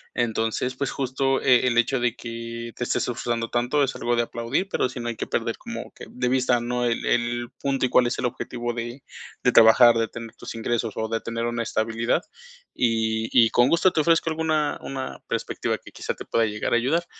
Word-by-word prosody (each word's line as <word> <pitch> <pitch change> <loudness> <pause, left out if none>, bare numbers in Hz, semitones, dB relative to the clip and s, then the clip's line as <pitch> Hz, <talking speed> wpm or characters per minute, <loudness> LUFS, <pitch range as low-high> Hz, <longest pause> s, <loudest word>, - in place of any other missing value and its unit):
Entonces, 115 +2 -1
pues, 140 +2 -2
justo, 135 0 0
eh, 125 -1 +4
el 120 -2 +1
hecho 120 +2 +2
de 120 -1 +1
que 115 0 -7
te - - -3
estés - - 0
disfrutando 120 -1 -2
tanto 125 +5 +1
es 135 - -1
algo 120 0 0
de 120 - +3
aplaudir, 115 +10 -2
pero 130 - 0
si 125 0 -7
no 120 - -4
hay 115 - -2
que - - -5
perder - - -1
como - - -7
que - - -11
de 125 0 -2
vista, 125 -1 +2
¿no?, 125 +1 -2
el 115 -1 -1
el 120 0 0
punto, 135 -2 +1
y - - 0
cuál 125 0 +4
es 120 - -3
el - - -1
objetivo 120 0 -3
de 120 +3 -6 0.4
de 125 - +4
trabajar 115 +1 +7
de 115 0 +1
tener 115 -1 -9
tus - - -8
ingresos, 115 -1 -1
o 110 - -1
de 115 0 -1
tener 115 0 -3
una 120 0 -1
estabilidad. 115 +6 0 0.5
Y, 115 -1 0
y 115 -3 +6
con 120 - +4
gusto 170 +2 +4
te 160 - +1
ofrezco 165 +1 +3
alguna 155 -2 0
una 135 -1 -5
perspectiva - - -2
que, - - -15
quizá, - - -4
te - - -10
pueda 115 - +2
llegar 105 +1 -2
a - - +5
ayudar, 150 +9 +1
120 Hz, 220 wpm, -24 LUFS, 115-130 Hz, 0.5 s, trabajar